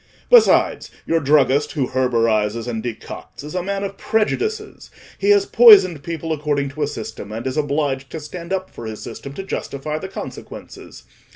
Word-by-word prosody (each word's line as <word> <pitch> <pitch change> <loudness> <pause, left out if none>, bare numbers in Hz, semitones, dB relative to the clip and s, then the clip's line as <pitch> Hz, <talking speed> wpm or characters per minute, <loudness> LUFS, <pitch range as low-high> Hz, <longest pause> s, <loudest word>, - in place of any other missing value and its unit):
Besides, 485 -2 +5 0.2
your 165 - +1
druggist, 140 -1 +2
who 135 -4 -1
herborises 115 -3 +1
and 115 -2 -3
decocts, 120 +3 -8
is 150 - -8
a 180 - -1
man 200 +2 -3
of 195 0 -5
prejudices: 420 - -2 0.3
he 405 - 0
has 405 -1 +5
poisoned 395 - +7
people 165 0 -4
according 145 -2 -1
to 145 +3 -8
a 145 - +1
system, 110 -5 -7
and 115 +3 -6
is 130 0 -2
obliged 140 -2 -1
to 160 - -6
stand 170 +3 -9
up 190 0 -2
for 115 - -8
his 110 -1 -7
system 140 - -8
to 195 - -6
justify 155 -5 -4
the 190 - -6
consequences. 190 - -10
150 Hz, 175 wpm, -20 LUFS, 130-190 Hz, 0.3 s, poisoned